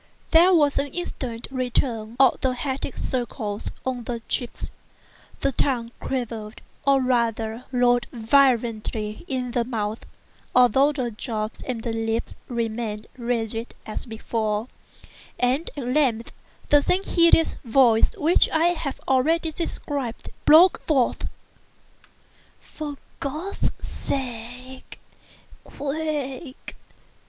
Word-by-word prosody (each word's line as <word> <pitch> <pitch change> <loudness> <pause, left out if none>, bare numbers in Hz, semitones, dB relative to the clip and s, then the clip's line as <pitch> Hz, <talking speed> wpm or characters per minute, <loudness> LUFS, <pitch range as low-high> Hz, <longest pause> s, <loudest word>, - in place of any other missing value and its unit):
There 340 +3 +7
was 295 -6 +4
an 280 - 0
instant 260 -7 -4
return 240 -3 -1
of 270 -2 +5
the 260 -1 +1
hectic 265 0 -2
circles 235 -4 -2 0.2
on 250 -2 -2
the 235 -1 -3
cheeks; 240 +1 -3 0.7
the 275 - +2
tongue 240 -3 0
quivered, 230 -4 -4 0.2
or 275 -1 +5
rather 235 -2 0
rolled 245 -2 +3
violently 225 -3 +1
in 255 -2 -2
the 240 -1 +1
mouth 220 -2 -3 0.5
(although 250 +3 +5
the 255 -5 -2
jaws 215 -1 -3 0.2
and 240 -3 -3
lips 225 0 -2
remained 225 -2 -3
rigid 235 -2 -2
as 215 - -6
before), 220 -1 -2 0.7
and 255 +6 +1
at 275 - -3
length 250 -4 +1 0.4
the 290 0 +6
same 370 +6 +1
hideous 335 -3 +4
voice 235 -2 +5
which 335 0 +4
I 325 +2 +3
have 315 -6 -3
already 320 +5 +2
described, 285 -6 -4
broke 335 +5 +7
forth: 270 -6 +1 1.3
"For 295 -2 -7 0.2
God's 310 +8 -2
sake!—quick! 265 +3 -6
250 Hz, 105 wpm, -24 LUFS, 230-280 Hz, 1.3 s, There